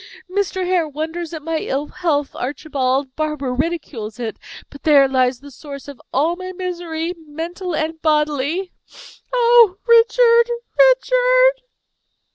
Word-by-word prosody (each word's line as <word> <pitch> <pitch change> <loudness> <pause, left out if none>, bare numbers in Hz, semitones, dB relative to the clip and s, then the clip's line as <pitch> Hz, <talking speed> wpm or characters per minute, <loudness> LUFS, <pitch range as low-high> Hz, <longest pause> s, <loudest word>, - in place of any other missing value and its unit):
Mr. 375 0 -2
Hare 355 -3 +1
wonders 320 +3 -5
at 320 -3 -7
my 325 0 -2
ill 280 0 -2
health, 295 -4 -2
Archibald; 270 -1 -2
Barbara 300 -4 -2
ridicules 260 -7 -4
it; 225 -3 -4 0.3
but 285 - -12
there 285 -3 +5
lies 255 -1 +1
the 285 0 -12
source 280 +1 -10
of 280 -3 -11
all 315 +6 +1
my 370 +1 -7
misery, 350 -2 -4
mental 340 +4 -5
and 315 +1 -3
bodily. 300 +3 0 0.6
Oh, 470 -5 +5
Richard! 465 0 +5 0.4
Richard!" - - +3
320 Hz, 125 wpm, -19 LUFS, 285-370 Hz, 0.6 s, there